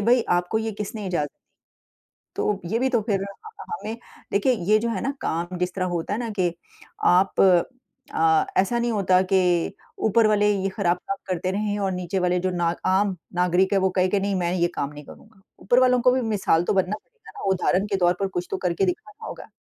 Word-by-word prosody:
भाई 240 Hz, 0 st, +5 dB, 0.2 s
आपको 180 Hz, +5 st, -1 dB
ये 220 Hz, 0 st, -3 dB
किसने 210 Hz, 0 st, -5 dB
इज़ाज़त 170 Hz, -5 st, -1 dB, 1.1 s
तो 205 Hz, -2 st, -1 dB
ये 220 Hz, +7 st, -1 dB
भी 265 Hz, +1 st, +1 dB
तो 240 Hz, -4 st, +2 dB
फ़िर 200 Hz, -3 st, -1 dB, 0.4 s
हमें 235 Hz, -, -6 dB, 0.3 s
देखिए, 205 Hz, +6 st, +3 dB
ये 215 Hz, -1 st, +2 dB
जो 235 Hz, +2 st, -1 dB
है 220 Hz, -5 st, -2 dB
ना 275 Hz, -, -1 dB
काम 175 Hz, +2 st, -2 dB
जिस 180 Hz, 0 st, -1 dB
तरह 185 Hz, -1 st, -1 dB
होता 165 Hz, +4 st, -2 dB
है 215 Hz, -, -2 dB
ना 235 Hz, -2 st, -3 dB
के 175 Hz, -2 st, +2 dB, 0.6 s
आप 185 Hz, +2 st, +3 dB, 0.7 s
अ, 160 Hz, -1 st, +3 dB
ऐसा 195 Hz, +6 st, +2 dB
नहीं 240 Hz, 0 st, 0 dB
होता 185 Hz, -4 st, +3 dB
के 190 Hz, -, +5 dB, 0.7 s
ऊपर 220 Hz, +1 st, +4 dB
वाले 210 Hz, -1 st, +3 dB
ये 195 Hz, -1 st, 0 dB
ख़राब 180 Hz, -3 st, 0 dB
काम 265 Hz, +8 st, -5 dB
करते 185 Hz, 0 st, -1 dB
रहें 205 Hz, +1 st, -1 dB
और 195 Hz, -1 st, 0 dB
नीचे 180 Hz, +1 st, -2 dB
वाले 180 Hz, 0 st, +1 dB
जो 185 Hz, +1 st, -1 dB
ना 175 Hz, -1 st, 0 dB, 0.2 s
आम 190 Hz, +1 st, +2 dB, 0.2 s
नागरिक 180 Hz, +2 st, +2 dB
हैं 195 Hz, -, +4 dB
वो 190 Hz, 0 st, +2 dB
कहे 185 Hz, 0 st, +4 dB
कि 200 Hz, -, +1 dB
नहीं 195 Hz, 0 st, -1 dB
मैं 175 Hz, -1 st, 0 dB
ये 175 Hz, -1 st, +2 dB
काम 140 Hz, 0 st, -2 dB
नहीं 150 Hz, 0 st, -10 dB
करूँगा। 215 Hz, +4 st, -16 dB, 0.2 s
ऊपर 245 Hz, +6 st, +3 dB
वालों 250 Hz, -1 st, +4 dB
को 250 Hz, +1 st, +5 dB
भी 260 Hz, 0 st, +1 dB
मिसाल 205 Hz, -7 st, +1 dB
तो 175 Hz, -, 0 dB
बनना 190 Hz, +2 st, +1 dB
पड़ेगा 465 Hz, -2 st, -19 dB
ना, -, -, -7 dB
उदाहरण 190 Hz, +1 st, +1 dB
के 200 Hz, -, -1 dB
तौर 175 Hz, -1 st, +3 dB
पर 195 Hz, -, 0 dB
कुछ 180 Hz, -2 st, -4 dB
तो 190 Hz, -, -1 dB
करके 180 Hz, +1 st, 0 dB
दिखाना 420 Hz, -, -5 dB
होगा। -, -, -9 dB
195 Hz, 215 wpm, -24 LUFS, 180-220 Hz, 1.1 s, भाई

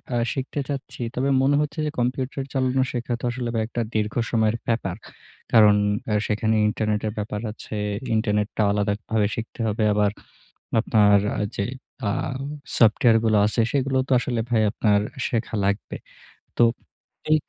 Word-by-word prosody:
আ -, -, +2 dB, 0.2 s
শিখতে 135 Hz, +1 st, -4 dB
চাচ্ছি। 135 Hz, -3 st, -5 dB
তবে 135 Hz, +2 st, 0 dB
মনে 140 Hz, +2 st, +3 dB
হচ্ছে 150 Hz, +1 st, -3 dB
যে 150 Hz, -, -1 dB
কম্পিউটার 130 Hz, +2 st, -1 dB
চালানো 130 Hz, 0 st, +1 dB
শেখা 120 Hz, 0 st, -3 dB
তো -, -, -16 dB
বা 120 Hz, -, +1 dB
আসলে 120 Hz, -1 st, -3 dB, 0.2 s
একটা 120 Hz, 0 st, -3 dB
দীর্ঘ 105 Hz, -1 st, 0 dB, 0.2 s
সময়ের 110 Hz, -1 st, +2 dB
ব্যাপার। 105 Hz, -6 st, -1 dB, 0.6 s
কারণ 105 Hz, -3 st, +7 dB, 0.5 s
সেখানে 110 Hz, +1 st, +1 dB
ইন্টারনেটের 105 Hz, 0 st, -1 dB
ব্যাপার 105 Hz, 0 st, -3 dB
আছে। 110 Hz, -, -10 dB, 0.4 s
ইন্টারনেটটা 105 Hz, -1 st, 0 dB
আলাদাভাবে 105 Hz, +1 st, 0 dB
শিখতে 115 Hz, +1 st, -7 dB
হবে। 110 Hz, +1 st, 0 dB
আবার 105 Hz, -1 st, +2 dB, 0.7 s
আপনার 105 Hz, -3 st, +4 dB, 0.4 s
যে 100 Hz, -, 0 dB, 0.5 s
আ -, -, +1 dB, 0.7 s
সফটওয়্যারগুলো 115 Hz, -1 st, +4 dB
আছে 110 Hz, +2 st, 0 dB
সেগুলো 135 Hz, -1 st, +1 dB
তো -, -, 0 dB
আসলে 120 Hz, -2 st, -2 dB
ভাই 110 Hz, -2 st, +3 dB
আপনার 105 Hz, -1 st, +2 dB, 0.3 s
শেখা 115 Hz, -1 st, -2 dB
লাগবে। 100 Hz, +1 st, -1 dB, 0.6 s
তো -, -, +5 dB, 0.7 s
এ -, -, +8 dB
110 Hz, 140 wpm, -24 LUFS, 105-125 Hz, 0.7 s, এ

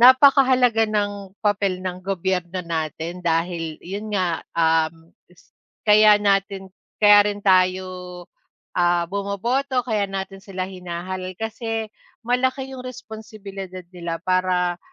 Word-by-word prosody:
Napakahalaga 255 Hz, -3 st, +6 dB
ng 205 Hz, -2 st, -2 dB
papel 200 Hz, -3 st, +1 dB
ng 180 Hz, 0 st, -3 dB
gobyerno 185 Hz, -1 st, -2 dB
natin 165 Hz, +1 st, -4 dB
dahil 165 Hz, -1 st, -1 dB
yun 200 Hz, +4 st, -5 dB
nga, 180 Hz, -4 st, 0 dB, 0.2 s
um, 165 Hz, 0 st, +1 dB, 0.7 s
kaya 210 Hz, 0 st, +7 dB
natin 195 Hz, -1 st, 0 dB, 0.3 s
kaya 205 Hz, 0 st, +8 dB
rin 205 Hz, 0 st, -10 dB
tayo 185 Hz, 0 st, +4 dB, 0.9 s
ah, 175 Hz, -1 st, +3 dB
bumoboto, 240 Hz, +7 st, -1 dB
kaya 215 Hz, -4 st, 0 dB
natin 195 Hz, 0 st, -5 dB
sila 190 Hz, -2 st, -4 dB
hinahalal 185 Hz, 0 st, -6 dB
kasi 225 Hz, 0 st, -3 dB, 0.3 s
malaki 260 Hz, +2 st, 0 dB
yung 255 Hz, 0 st, -8 dB
responsibilidad 205 Hz, -6 st, -8 dB
nila 170 Hz, -2 st, -4 dB
para 185 Hz, -1 st, +1 dB
195 Hz, 110 wpm, -22 LUFS, 180-215 Hz, 0.9 s, kaya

